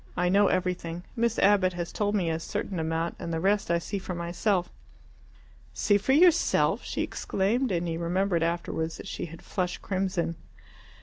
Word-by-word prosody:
I 180 0 +2
know 200 +2 +5
everything. 175 -2 -1
Miss 235 -1 +1
Abbott 195 -2 +4
has 175 0 -4
told 205 0 0
me 175 -5 +1
a 160 - -1
certain 180 +2 -4
amount, 160 +1 -2
and 170 -1 -4
the 165 - -1
rest 200 +3 +1
I 170 - +3
see 195 +4 -4
for 185 -1 -5
myself." 175 +2 0 1.0
"See 205 -1 +3
for 265 +6 +1
yourself?" 345 +2 +4
she - - -2
exclaimed, 230 +6 0
and 175 -1 0
he 165 -1 -2
remembered 175 +1 0
afterwards 165 -1 -2
that - - -9
she - - -4
had 165 0 -11
flushed 180 -2 -3
crimson. 185 -3 -1
180 Hz, 175 wpm, -28 LUFS, 170-200 Hz, 1.0 s, know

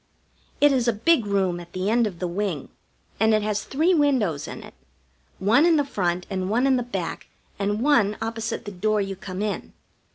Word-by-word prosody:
It 290 0 +6
is 250 -3 +1
a 235 - +3
big 235 +2 +2
room 190 -3 0
at 175 0 -12
the 185 +3 -1
end 235 -1 +3
of 185 -4 -7
the 180 - -2
wing, 180 -5 -3 0.5
and 220 0 +4
it 215 - +1
has 210 0 -1
three 320 +7 +1
windows 245 - +1
in - - -8
it: - - -13 0.6
one 225 +9 +4
in 340 -1 +5
the 290 -2 +2
front 180 -8 -1
and 190 -1 -3
one 240 +5 +2
in 270 -1 +4
the 250 - +1
back 245 0 -5 0.3
and 205 +3 -1
one 235 -8 +3
opposite 225 +1 -4
the 205 - -5
door 210 +3 0
you 195 -1 -2
come 190 +1 -5
in. 210 -1 -4
210 Hz, 205 wpm, -24 LUFS, 190-245 Hz, 0.6 s, It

